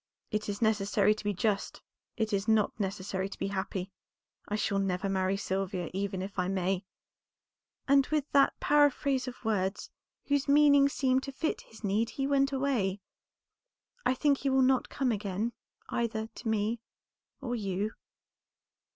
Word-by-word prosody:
'It 215 0 -2
is 205 +3 -2
necessary 210 -1 +3
to 215 - -9
be 205 - 0
just, 200 +1 -1 0.3
it 220 -2 -1
is 200 +1 0
not 220 -2 +3
necessary 195 -1 -2
to - - -9
be - - -2
happy. 195 -1 -3 0.6
I 210 - -2
shall 200 -1 0
never 190 0 -1
marry 190 0 +1
Sylvia, 190 -2 -2
even 190 -1 -2
if 195 0 -6
I 180 - +1
may,' 190 0 -1 1.0
and 275 -1 +5
with 305 -2 0
that 280 -1 +4
paraphrase 285 -2 +3
of 250 -1 -8
words, 200 -2 -1 0.3
whose 285 0 +1
meaning 285 -1 +6
seemed 260 -2 +1
to 275 - -6
fit 315 +4 -2
his 225 - -16
need, 210 +3 +1
he 270 +4 -2
went 275 0 +2
away. 255 -8 0 1.0
I 260 - +2
think 285 0 +2
he 275 - 0
will 265 0 +4
not 260 0 +2
come 260 -3 0
again 205 +2 -2 0.4
either 225 -2 -1
to 225 +1 -9
me 220 +1 0 0.6
or 255 -3 -4
you." 200 -1 -2
215 Hz, 160 wpm, -30 LUFS, 195-265 Hz, 1.0 s, meaning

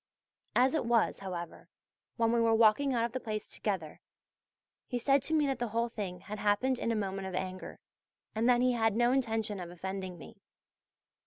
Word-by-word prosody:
As 255 +3 +4
it 315 - +1
was, 230 -1 +2
however, 180 -3 -7 0.5
when 230 -1 +2
we 235 0 +3
were 225 -1 +4
walking 230 +5 +4
out 235 -2 +1
of 235 - -4
the 255 - -3
place 215 -3 -4
together, 185 -8 -4 0.9
he 245 - -2
said 275 +3 +3
to 320 - 0
me 300 -2 +3
that 270 -2 -1
the 240 - -1
whole 230 +2 -1
thing 190 -6 -5
had 210 0 -7
happened 225 +6 +1
in 230 - 0
a - - +1
moment 195 -2 -2
of 185 - -5
anger, 185 0 -5 0.6
and 225 +3 +1
that 245 -1 +5
he 255 0 +4
had 225 -3 +1
no 240 +1 +3
intention 225 -6 0
of 175 -1 -6
offending 185 +1 -5
me. - - -12
225 Hz, 195 wpm, -31 LUFS, 195-240 Hz, 0.9 s, that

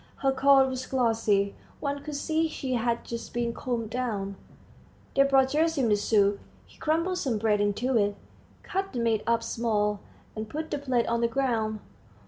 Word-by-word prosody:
Her 270 - +5
coat 270 0 +5
was 255 -1 -4
glossy; 225 -6 +1 0.3
one 285 -1 -2
could 300 0 -6
see 320 +3 0
she 265 -4 -4
had 235 -1 0
just 235 0 -7
been 235 -1 0
combed 230 -3 -3
down. 210 -6 -2 0.8
They 275 - +5
brought 270 -1 +4
Gerasim 305 -5 +2
the 210 - +5
soup. 205 -1 +2 0.3
He - - -21
crumbled 335 +4 0
some 245 -5 0
bread 210 -1 +2
into 215 +6 0
it, 205 -1 +1 0.5
cut 390 -2 -3
the 245 - -2
meat 225 -2 +1
up 230 0 +2
small, 210 -3 0 0.4
and 215 0 -5
put 310 +5 -5
the 290 - -1
plate 255 -4 +1
on 235 0 0
the 235 - +3
ground. 230 -4 -1
235 Hz, 175 wpm, -27 LUFS, 220-275 Hz, 0.8 s, Her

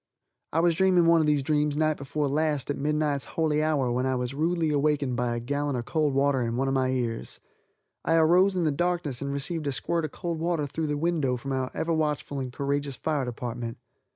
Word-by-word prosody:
I 165 - +2
was 170 0 +4
dreaming 180 0 +4
one 165 -1 +5
of 155 - +1
these 145 -2 +2
dreams 150 0 +1
night 155 0 +2
before 145 +1 -2
last 150 -1 0
at - - -2
midnight's 150 -1 0
holy 155 -2 +2
hour 145 -5 +1
when 125 +2 0
I 130 - +1
was 125 +1 -2
rudely 160 +2 0
awakened 145 -3 +1
by 120 0 0
a - - -2
gallon 145 +3 -2
of 120 -1 -3
cold 150 -2 0
water 140 -1 +2
in 115 -1 -1
one 135 +1 +1
of 135 - 0
my 130 -1 +1
ears. 120 -3 -3 0.6
I 165 - +2
arose 180 +4 +4
in 175 - +1
the 155 - +2
darkness 170 -4 -1
and 140 0 -2
received 150 +2 -3
a - - +1
squirt 165 +4 -1
of 155 - -2
cold 170 -3 -4
water 165 -2 0
through 155 +3 -3
the 150 0 -1
window 150 -5 0
from 135 +3 -6
our 130 -1 -1
ever 165 +1 0
watchful 150 -3 -1
and 130 -2 -4
courageous 140 +1 -2
fire 150 0 -1
department. 120 -1 -5
145 Hz, 225 wpm, -27 LUFS, 130-160 Hz, 0.6 s, one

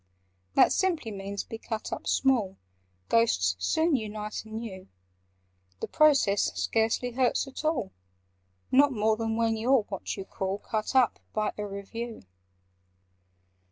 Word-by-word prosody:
"That - - +6
simply 335 -12 0
means 200 0 -5
'be 225 - -8
cut 220 -1 -4
up - - -6
small': 230 -8 +2 0.5
Ghosts 90 - +3
soon 320 - +2
unite 215 -2 -4
anew. 220 -4 -7 0.9
The - - -3
process 275 -10 +4
scarcely 225 +2 +1
hurts 250 +2 +1
at 270 +2 -8
all— 285 -11 -1 0.8
Not 280 +2 +6
more 220 -1 +2
than 225 0 -2
when 225 0 +1
you 230 +4 0
're 265 -5 +5
what 200 -1 -5
you 195 - -5
call 190 0 -3
'Cut 215 +4 -3
up' 255 -3 +4
by 215 -1 0
a 210 0 -4
Review. 220 - -6
225 Hz, 135 wpm, -28 LUFS, 205-250 Hz, 0.9 s, That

